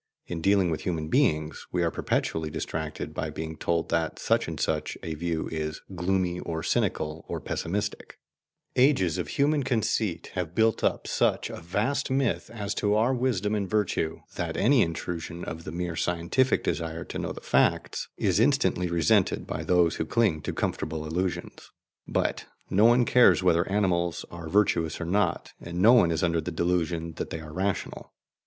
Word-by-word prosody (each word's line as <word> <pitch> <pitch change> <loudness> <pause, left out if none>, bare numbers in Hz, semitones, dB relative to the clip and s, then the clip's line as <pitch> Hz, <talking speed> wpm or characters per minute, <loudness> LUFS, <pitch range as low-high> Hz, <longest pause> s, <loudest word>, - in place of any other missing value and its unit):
In 85 -2 -5
dealing 95 -1 +3
with 80 - -2
human 80 -4 -2
beings, 80 - +1
we 90 -1 +1
are 85 - +1
perpetually 80 -1 -1
distracted 80 0 -4
by - - -3
being 80 0 -5
told 85 +1 -1
that 80 -2 0
such - - +1
and - - -5
such - - -1
a 80 - -3
view 80 0 -2
is 80 -1 -3
gloomy 90 0 0
or 80 -2 -4
cynical 75 +1 -1
or - - -3
pessimistic: 105 +5 -3 0.6
ages 125 - +3
of 85 - -2
human 145 - +2
conceit 110 -8 -1
have 90 -2 -3
built 110 -1 +2
up - - +1
such - - +1
a - - -7
vast 110 - -1
myth 130 -4 0
as 105 -3 -3
to 105 0 +1
our 115 +5 +3
wisdom 120 -5 0
and 100 -3 -1
virtue 100 -6 0 0.2
that - - -2
any 125 +4 +4
intrusion 85 0 -3
of 80 +1 -6
the - - -5
mere 85 0 -3
scientific 90 +11 +1
desire 80 -1 -2
to - - -6
know - - -3
the - - -7
facts - - +1
is 95 0 +2
instantly 125 -8 +2
resented 85 -3 +2
by - - -4
those 90 -2 +3
who 80 - -1
cling 100 -9 +2
to - - -3
comfortable 80 0 -3
illusions. 90 +4 -3 0.4
But - - -1 0.2
no 105 +4 +5
one 120 +1 +5
cares 125 -7 +5
whether 85 0 +3
animals 85 -5 +1
are 85 -2 -7
virtuous 85 -4 +2
or 85 - -3
not, 100 +5 0
and 85 0 -6
no 110 +6 +7
one 110 -9 +6
is 80 0 0
under 85 -2 +2
the 80 - -4
delusion 85 -1 -1
that - - -4
they 80 - -4
are 75 -1 -10
rational. 95 +3 -3
90 Hz, 175 wpm, -27 LUFS, 80-105 Hz, 0.6 s, no